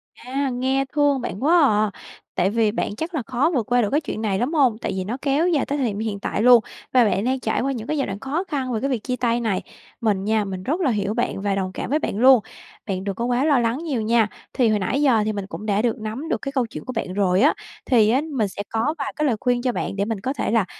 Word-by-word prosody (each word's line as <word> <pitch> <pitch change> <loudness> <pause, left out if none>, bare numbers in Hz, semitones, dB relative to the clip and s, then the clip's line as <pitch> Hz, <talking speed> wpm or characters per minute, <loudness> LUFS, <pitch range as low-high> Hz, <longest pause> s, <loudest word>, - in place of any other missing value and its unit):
À, 270 +2 -3
nghe 260 +2 0
thương 290 -3 +2
bạn 235 0 -5
quá 335 +4 +5
à! 215 -6 +3 0.4
Tại 185 +1 +2
vì 220 -1 +2
bạn 205 - -2
chắc 320 - -5
là 295 - 0
khó 270 +5 +1
vượt 235 - +1
qua 245 0 +4
được 210 - 0
cái 295 - +2
chuyện 255 -7 -5
này 200 -3 0
lắm 255 +7 -1
hông? 260 -8 +3
Tại - - -2
vì 190 - -2
nó 225 +7 -4
kéo 290 +4 +2
dài 315 -6 +2
tới 285 - -2
thời 265 -4 +1
điểm 205 -1 -3
hiện 215 -2 -3
tại 210 - -2
luôn 245 -1 +7 0.3
và 250 - +6
bạn 200 0 +1
đang 260 +1 0
trải 220 -2 -1
qua 275 - 0
những 235 -3 -5
cái 305 - -1
giai 275 - 0
đoạn 195 +1 -5
khó 290 - -2
khăn 265 -7 -2
về 220 - 0
cái 275 - 0
việc 245 -6 -2
chia 250 - -2
tay 235 -1 0
này. 220 -5 -1 0.4
Mình 205 -4 +1
nha, 215 0 +1
mình 190 -1 -5
rất 310 - -1
là 275 -7 +2
hiểu 205 -1 -1
bạn 235 -4 -2
và 200 -1 0
đồng 190 -1 -2
cảm - - -5
với 300 +4 +2
bạn 205 - -3
luôn. 260 +1 +7 0.5
Bạn 190 -1 -2
đừng 200 -1 -3
có 235 - -2
quá 245 +3 +1
lo 290 -4 +4
lắng 230 +1 0
nhiều 280 -9 -1
nha! 225 0 +3 0.3
Thì 245 -3 +3
hồi 215 -1 +2
nãy 260 +9 0
giờ 255 -7 +4
thì 215 - -1
mình 200 -2 -4
cũng 210 - -7
đã 210 0 +1
được 235 0 0
nắm 225 +9 -5
được - - -1
cái 275 - -4
câu 260 -3 +1
chuyện - - -9
của 255 - -5
bạn 190 -5 -3
rồi 190 0 +2
á, 295 - +5 0.3
thì 225 -5 +4
á 255 +5 +3
mình 225 -6 +1
sẽ 200 +1 -6
có 230 +8 0
vài 275 -2 -4
cái 300 - 0
lời 250 -6 +2
khuyên 245 -2 +1
cho 250 - +1
bạn 230 - -3
để 200 +1 0
mình 225 -2 -3
có 260 +6 -2
thể 285 - -2
là 225 -4 +3
240 Hz, 295 wpm, -22 LUFS, 210-270 Hz, 0.5 s, luôn